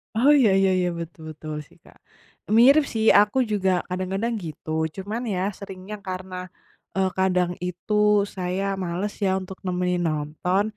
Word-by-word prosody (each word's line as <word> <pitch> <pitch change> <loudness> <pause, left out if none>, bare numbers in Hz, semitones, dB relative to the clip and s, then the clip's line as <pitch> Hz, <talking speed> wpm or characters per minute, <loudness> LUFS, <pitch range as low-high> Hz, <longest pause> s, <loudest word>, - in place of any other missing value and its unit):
Oh, 265 +6 +5
iya 220 -6 +5
iya 190 -1 +3
iya, 180 0 +1
betul 165 -1 -8
betul 155 0 -7
sih, - - -23
Kak. - - -20 0.6
Mirip 280 +5 +7
sih. 220 0 0 0.2
Aku 210 +4 0
juga 190 -3 +1
kadang-kadang 190 +5 -2
gitu. 160 -2 -7 0.2
Cuman 205 +4 -4
ya 185 -4 -1 0.2
seringnya 195 +1 -8
karena, 185 0 -5 0.6
eee, 190 -1 +2
kadang 180 -2 +2 0.2
itu 180 +4 -3 0.4
saya 185 +1 -2 0.2
males 180 +4 -2
ya 190 0 +2
untuk 185 0 -9
nemenin 180 0 0
nonton. 155 +5 0
185 Hz, 150 wpm, -24 LUFS, 180-205 Hz, 0.6 s, Mirip